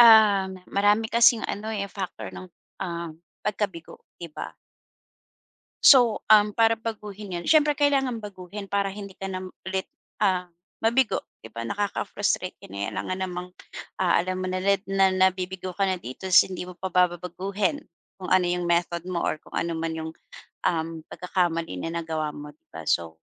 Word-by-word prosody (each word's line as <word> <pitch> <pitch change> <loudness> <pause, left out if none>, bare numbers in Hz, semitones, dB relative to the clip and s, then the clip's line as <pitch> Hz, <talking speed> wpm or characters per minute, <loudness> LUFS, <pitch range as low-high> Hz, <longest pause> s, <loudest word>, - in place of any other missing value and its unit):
Ah, 215 -4 +8 0.2
marami 205 +2 +3
kasing 235 -1 +6
ano, 215 +2 -3
eh, 200 -2 -2
factor 185 - -6
ng, 90 0 -8 0.4
uhm, 170 -2 -4 0.3
pagkabigo, 205 -5 -3 0.2
di 170 - -8
ba? - - -6 1.3
So, 245 -5 +7
uhm, 210 -1 +5
para 225 0 +5
baguhin 210 -4 -6
'yon 175 - -6
siyempre 300 -2 +4
kailangan 270 -4 +2
baguhin, 200 -1 -8
para 200 0 0
hindi 200 -1 -8
ka 195 +1 -6
na 185 0 -4
ulit, 190 +1 -4 0.3
ah, 185 -3 +1 0.3
mabigo, 230 +1 +2 0.2
'di 110 - -12
ba? 115 - -5
Nakaka-frustrate 200 - -1
din, 100 +1 -8
eh, - - -1
alangan 185 0 -3
namang, 180 0 -5 0.5
ah, 180 - +4
alam 185 +1 -1
mo 185 - -2
na 185 - -1
ret 195 +1 +2
na 195 -1 +4
nabibigo 185 0 +1
ka 195 - +3
na 185 -2 -1
dito 130 +10 -8
sin 185 - +7
hindi 180 - -4
mo 180 - -9
pa 190 +1 -5
ba 180 0 +5
babaguhin, 185 - -2 0.4
kung 185 -2 -6
ano 185 -1 +4
yung 175 0 -1
method 170 0 0
mo 180 -2 -2
or - - 0
kung - - -19
ano 170 -1 -1
man 165 0 -2
yung, 160 0 -5 0.5
uhm, 165 -1 -1
pagkakamali 175 -2 -1
na 165 - -3
nagawa 160 -2 -2
mo, 150 0 -9
'di 150 - -42
ba? 80 0 -9
So, 80 -1 0
185 Hz, 170 wpm, -26 LUFS, 170-205 Hz, 1.3 s, Ah